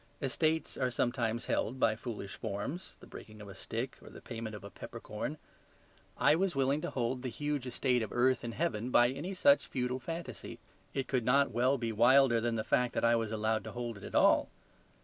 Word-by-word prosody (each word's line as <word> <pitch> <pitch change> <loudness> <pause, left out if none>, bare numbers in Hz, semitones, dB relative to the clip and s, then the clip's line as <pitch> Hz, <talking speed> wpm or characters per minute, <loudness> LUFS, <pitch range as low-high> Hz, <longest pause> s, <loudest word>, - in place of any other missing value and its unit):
Estates 155 +4 0
are 130 -1 +1
sometimes 120 -1 -1
held 130 +4 -1
by 115 -3 +3
foolish 110 -4 -6
forms, 115 - -5
the - - -11
breaking 110 0 -11
of 105 - -9
a 100 - -8
stick 115 +6 -5
or - - -12
the - - -11
payment 115 -2 -6
of 105 - -10
a 100 - -9
peppercorn: - - -6 0.8
I - - +5
was 185 +1 +1
willing 135 +2 +2
to - - -3
hold 125 0 -1
the 130 - -3
huge 145 +1 -3
estate 125 -1 +1
of 110 - -4
earth 125 +1 +2
and 115 -1 -5
heaven 125 -8 -1
by 120 -1 +5
any 170 +9 -5
such 140 -5 +4
feudal 125 0 -2
fantasy. 165 +6 -6 0.4
It 135 -1 -1
could 130 -3 0
not 140 +4 +3
well 130 +3 +2
be 115 -2 -2
wilder 120 +1 +5
than 120 0 0
the 110 - -1
fact 125 +1 +1
that - - +1
I 115 0 +5
was 115 -2 -1
allowed 110 0 0
to 110 - -7
hold 120 -1 -4
it - - -14
at - - -7
all. - - +5
125 Hz, 210 wpm, -32 LUFS, 115-135 Hz, 0.8 s, I